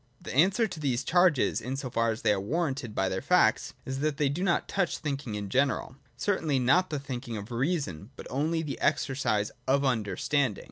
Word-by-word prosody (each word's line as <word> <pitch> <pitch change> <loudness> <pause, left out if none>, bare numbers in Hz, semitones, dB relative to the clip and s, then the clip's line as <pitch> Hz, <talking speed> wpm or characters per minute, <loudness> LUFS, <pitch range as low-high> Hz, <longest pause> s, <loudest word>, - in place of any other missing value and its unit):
The - - -7
answer 190 - +4
to 175 - -8
these 130 -4 0
charges, 175 -1 +3
in 130 +1 -3
so 130 -2 -5
far 115 0 +1
as 110 0 -3
they 105 - +4
are 100 - -1
warranted 135 - -2
by 95 - +1
their 95 0 -2
facts, - - +2
is, 135 0 -4
that 150 -1 0
they 145 -1 +2
do 145 +6 -3
not 175 -3 +1
touch 185 -4 0
thinking 140 -7 -4
in 105 -1 -4
general, 130 +3 0 0.2
certainly 165 -8 0
not 150 +9 +3
the 150 - -2
thinking 125 -4 -5
of 105 +3 -8
Reason, 120 - -2
but - - -10
only 160 +5 0
the 150 - -5
exercise 130 -8 +1 0.2
of 140 +1 +3
Understanding. 125 +1 0
135 Hz, 200 wpm, -28 LUFS, 120-155 Hz, 0.2 s, answer